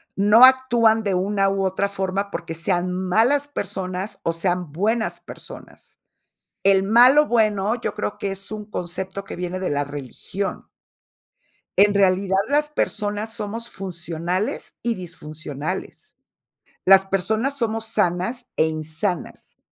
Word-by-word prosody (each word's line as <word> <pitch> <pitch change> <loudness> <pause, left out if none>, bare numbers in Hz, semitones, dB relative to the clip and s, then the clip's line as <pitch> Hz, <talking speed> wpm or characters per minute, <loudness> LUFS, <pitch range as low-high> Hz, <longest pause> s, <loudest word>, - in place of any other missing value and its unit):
no 210 +5 +7
actúan 240 -4 +4
de 200 -2 0
una 195 +2 +1
u 195 0 -1
otra 190 +1 0
forma 195 0 -2
porque 165 -1 -5
sean 180 +1 -1
malas 225 +11 +2
personas 190 -7 -4
o 165 - 0
sean 175 -1 -2
buenas 220 +8 -1
personas. - - -12 0.6
El 195 -1 +4
"malo 245 +9 +6
bueno", 215 -3 +2
yo - - -3
creo 210 -1 -4
que 195 - -2
es 195 0 -6
un 215 -1 -7
concepto 190 +1 -4
que - - -8
viene 180 +1 -4
de 185 - -2
la 145 0 0
religión. 145 +7 -6 1.1
En 205 +1 +6
realidad, 190 -1 +2
las 295 +1 +2
personas 210 -6 -2
somos 230 +2 -4
funcionales 180 - -3
y 235 -1 0
disfuncionales. 160 -1 -7 0.7
Las 195 0 +8
personas 220 +8 0
somos 225 -2 -1
sanas 205 +2 0
e 160 - +3
insanas 160 +4 -4
195 Hz, 130 wpm, -22 LUFS, 180-220 Hz, 1.1 s, Las